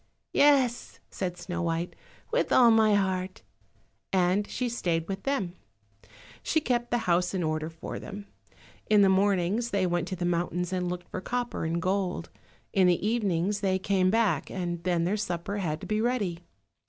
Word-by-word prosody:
"Yes," 270 -5 +3
said 180 -2 -3
Snow 175 0 -4
white, 170 +1 -2 0.4
"with - - +1
all 240 -2 +7
my 220 -2 +5
heart," 190 -1 -1 0.7
and 190 +2 +2
she 250 - -2
stayed 170 -8 -1
with 195 0 -4
them. 210 -11 -1 0.9
She 320 - +1
kept 240 -5 -1
the 240 - +2
house 180 +2 +2
in 180 - 0
order 155 0 -1
for 165 0 -7
them; 205 0 -8 0.6
in 210 -1 +6
the 195 - +5
mornings 195 +3 +2
they 195 -3 +1
went 175 -1 0
to 185 - -3
the 175 0 -3
mountains 175 +1 -1
and 180 -1 -1
looked 180 0 -5
for 185 - -5
copper 245 -5 -3
and 165 +1 -1
gold, 185 -1 -1 0.4
in 190 -2 +4
the 180 +3 +2
evenings 205 -3 0
they 190 -2 +1
came 190 -1 +2
back, 200 -8 +1
and 175 -2 -4
then 175 -2 +1
their 190 +5 0
supper 200 0 -3
had 160 -6 -2
to - - -6
be 215 0 0
ready. 215 -8 0
185 Hz, 175 wpm, -28 LUFS, 175-210 Hz, 0.9 s, all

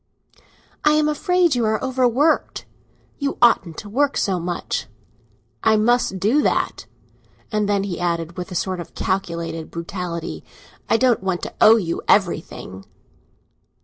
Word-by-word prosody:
"I 300 - +5
am 305 0 +3
afraid 355 +2 +2
you 245 -2 0
are 220 0 +1
overworked; 260 +4 +1 0.5
you 280 -1 -2
oughtn't 195 -9 +3
to 210 - -7
work 275 +7 +1
so 190 -3 0
much." 175 0 -3 0.8
"I 220 -1 +4
must 220 -3 +2
do 230 +11 +3
that." - - -1 0.6
And 210 -1 0
then 200 -1 +1
he 185 -4 -4
added, 170 -1 -2
with 180 0 -6
a - - -5
sort 185 +1 -2
of 170 - -9
calculated 170 -4 -3
brutality, 170 -1 -5 0.5
"I - - +4
don't 245 -3 +2
want 190 -2 -2
to - - -5
owe 220 - +8
you 175 -7 -2
everything!" 160 - 0
200 Hz, 145 wpm, -21 LUFS, 175-245 Hz, 0.8 s, owe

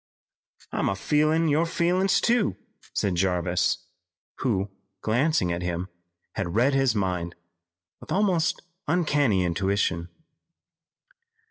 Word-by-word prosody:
"I'm 95 - 0
feelin' 155 - +2
your 155 +3 +2
feelin's 180 +3 +2
too," 235 -3 +2 0.3
said 100 - 0
Jarvis, 90 0 0 0.5
who, 100 -5 0 0.3
glancing 120 - +1
at 85 - -3
him, 90 +1 -3 0.4
had 95 -3 -3
read 125 +5 +3
his 135 -4 +2
mind 90 -4 -1 0.6
with - - -12
almost 185 -5 +1 0.2
uncanny 145 - +2
intuition. 90 -1 0
110 Hz, 100 wpm, -26 LUFS, -, 0.6 s, read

